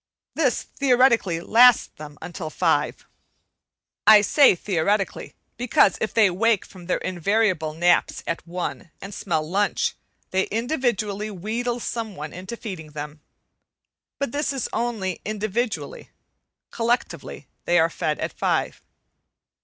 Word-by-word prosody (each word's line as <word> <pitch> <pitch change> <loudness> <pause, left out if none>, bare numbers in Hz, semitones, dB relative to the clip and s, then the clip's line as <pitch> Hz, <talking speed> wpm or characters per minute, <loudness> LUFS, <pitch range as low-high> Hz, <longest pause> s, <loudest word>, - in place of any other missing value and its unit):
This - - +1
theoretically 245 -10 +2
lasts 240 +6 +5
them 150 -1 -10
until 165 -1 -6
five. - - 0 1.0
I 215 -1 +9
say 270 +2 +5
theoretically, 195 +2 -1 0.2
because 235 -5 +3
if 220 - -1
they 215 -4 +4
wake 220 +3 +1
from 180 -3 -14
their 180 - +1
invariable 185 -3 0
naps 175 +1 +2
at 170 0 -4
one, 175 0 -5
and 195 +1 -8
smell 160 -6 -2
lunch, 200 +4 0 0.4
they 190 0 +1
individually 225 -4 -1
wheedle 230 +5 -3
some 225 -3 -4
one 150 +1 -7
into 190 +6 -7
feeding 160 -10 -8
them. 150 0 -7 1.0
But 280 -4 -2
this 290 +2 -1
is 270 -3 -2
only 210 -7 -2
individually. 215 - -3 0.6
Collectively 235 +2 -2 0.2
they 175 - +3
are 165 0 +3
fed 155 -1 -2
at - - -4
five. - - -1
200 Hz, 125 wpm, -23 LUFS, 175-230 Hz, 1.0 s, I